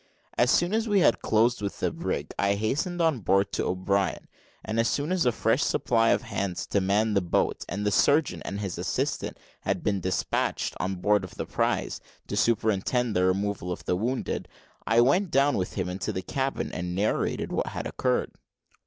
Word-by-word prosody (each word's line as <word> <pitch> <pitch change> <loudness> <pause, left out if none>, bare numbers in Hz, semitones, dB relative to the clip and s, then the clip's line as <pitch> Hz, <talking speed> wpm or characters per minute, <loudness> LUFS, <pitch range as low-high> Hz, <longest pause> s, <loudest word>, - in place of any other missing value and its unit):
As 120 - +3
soon 175 +8 +3
as 225 0 0
we 205 -2 +4
had 120 - +3
closed 115 +1 +2
with 100 -1 -4
the - - 0
brig, - - -3
I 100 0 +2
hastened 145 - -1
on 160 -6 +2
board 95 0 +2
to - - -1
O'Brien, 95 0 -1 0.4
and 110 +1 -1
as 115 - +3
soon 145 +6 -1
as 180 -8 +2
a - - +5
fresh 115 +4 +1
supply 115 -4 +2
of - - +2
hands 95 -3 -3
to 100 - +2
man 105 +3 +2
the 100 - +3
boat, 85 - 0
and 100 +3 -3
the 105 - +2
surgeon 145 +8 +3
and 100 - -4
his 95 -4 -4
assistant - - -2 0.2
had - - -2
been 100 -2 +1
despatched 95 +1 -1
on 95 +1 -1
board 105 +2 +2
of 90 - -9
the - - -4
prize, - - -1 0.2
to - - -4
superintend 110 +1 +1
the 90 0 +3
removal 95 -1 -1
of 90 - -6
the 90 - +1
wounded, 120 +7 -2 0.4
I 115 +2 +5
went 175 +10 +3
down 140 0 +3
with 95 -1 -2
him - - -2
into 90 +2 -3
the 95 - -4
cabin, 135 0 -2
and 90 0 -4
narrated 100 +3 0
what - - -1
had - - -5
occurred. 125 -1 0
105 Hz, 195 wpm, -27 LUFS, 95-125 Hz, 0.4 s, a